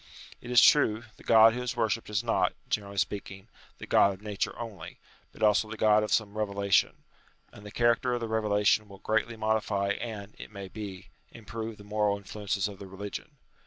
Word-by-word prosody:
It 120 - -10
is 125 -1 +6
true, 115 -7 +5
the - - -16
God 110 0 +7
who 125 - -4
is 125 +1 -3
worshipped 115 -1 -1
is 105 -2 -1
not, - - +1 0.2
generally 100 -1 -3
speaking, 100 +1 -3 0.3
the - - -8
God 100 -1 +4
of 95 - -20
Nature 105 -2 -3
only, 105 -8 -8 0.3
but - - -8
also 105 0 +3
the 110 - -7
God 105 0 +4
of 105 - -3
some 105 -2 +1
reve 110 -1 0
lation; 100 -1 +2 0.6
and 105 - -13
the 105 - -9
character 120 +3 +2
of - - -2
the 115 - -4
revelation 105 -1 +1
will 100 - -12
greatly 110 +3 -1
modify 110 -2 0
and, 105 -1 -5
it - - -9
may 100 -2 -8
be, 95 -2 -8 0.2
improve 110 0 -7
the 100 - -13
moral 105 -1 0
influences 100 0 -3
of 100 -2 -10
the 100 - -9
religion. 100 +9 -8
105 Hz, 200 wpm, -28 LUFS, 100-110 Hz, 0.6 s, God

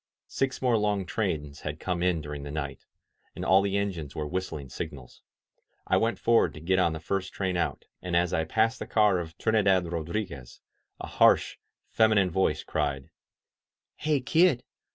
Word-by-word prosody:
Six 135 0 -2
more 125 -3 +3
long 105 -2 0
trains 80 -8 -3
had 75 0 -5
come 90 -2 -2
in 90 -3 +1
during 75 -1 -6
the 70 - -7
night, 70 -2 -5 0.5
and - - -5
aU 95 +1 +5
the 100 0 0
engines 90 -8 -3
were 75 -1 -3
whistUng 80 -6 -4
signals. 65 -1 -8 0.7
^I - - +3
went 115 +1 +1
forward 115 -10 +3
to - - -8
get 95 +4 +1
on 85 -3 +2
the 80 - -5
first 95 +4 -3
train 95 -2 -2
out, 85 - -2 0.2
and 90 -1 -3
as 85 0 +2
I 80 - +1
passed 110 +7 +1
the - - -6
car 105 -4 +3
of 80 0 -7
Trinidad 100 -5 +2
Rodriguez, 85 - -4 0.4
a - - -5
harsh, - - +3 0.4
femi 110 -1 +5
nine 95 -3 +3
voice 80 -5 +1
cried: 70 -3 -2 0.8
"Hey, 150 -3 0
kid! 160 -1 +3
90 Hz, 175 wpm, -28 LUFS, 75-105 Hz, 0.8 s, aU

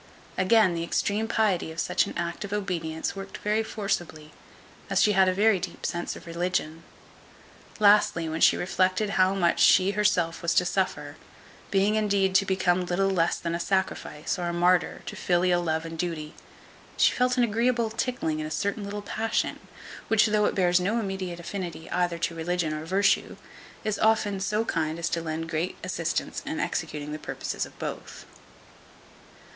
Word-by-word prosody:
Again, 190 0 +4
the 165 0 -2
extreme 210 +5 0
piety 205 -8 +1
of 160 - -7
such 180 - +1
an - - -7
act 170 +3 -3
of 200 - -7
obedience 175 -6 -3
worked 195 0 -7
very 210 +1 0
forcibly, 175 -8 -4 0.6
as - - +2
she 210 - +4
had 190 -2 +4
a - - +3
very 200 +1 +3
deep - - -6
sense 175 0 -3
of - - -11
religion. 170 -2 -2 1.0
Lastly, 205 -5 +4
when 160 +1 -3
she - - +6
reflected 185 +3 0
how 190 0 +3
much 175 -3 +2
she 190 +1 +5
herself 190 -5 +1
was 170 - 0
to 180 - +4
suffer, 150 -6 -2 0.5
being 200 +2 +2
indeed 200 -3 +1
to 195 +1 +3
become 185 -1 +2
little 195 +2 +1
less 170 -3 +1
than 170 -1 -3
a 170 - -2
sacrifice, 190 -3 -2
or 175 - -2
a 170 - -2
martyr, 175 +1 +2
to - - -6
filial 175 0 +2
love 160 -1 -1
and 165 0 -7
duty, 160 -3 -3 0.6
she - - +5
felt 250 0 +1
an 245 - +4
agreeable 235 0 +1
tickling 225 -9 -2
in 155 - -3
a - - -6
certain 200 +6 -2
little 205 +1 -5
passion, 225 +2 -1 0.5
which 220 -1 +4
though 210 -1 +2
it - - 0
bears 180 -1 +3
no 205 +6 0
immediate 190 -4 -4
affinity 170 -2 -6
either 175 -1 0
to 170 0 -2
religion 165 -1 -1
or 155 +1 -5
virtue, 195 +3 +1 0.5
is 215 -2 -2
often 215 -3 +2
so 210 +3 0
kind 160 -4 -1
as 170 0 -2
to 170 - -1
lend 165 0 -4
great 165 +2 -2
assistance - - -2
in - - -4
executing 150 0 -3
the 155 - -5
purposes - - -4
of - - -19
both. - - -7
185 Hz, 175 wpm, -26 LUFS, 170-205 Hz, 1.0 s, she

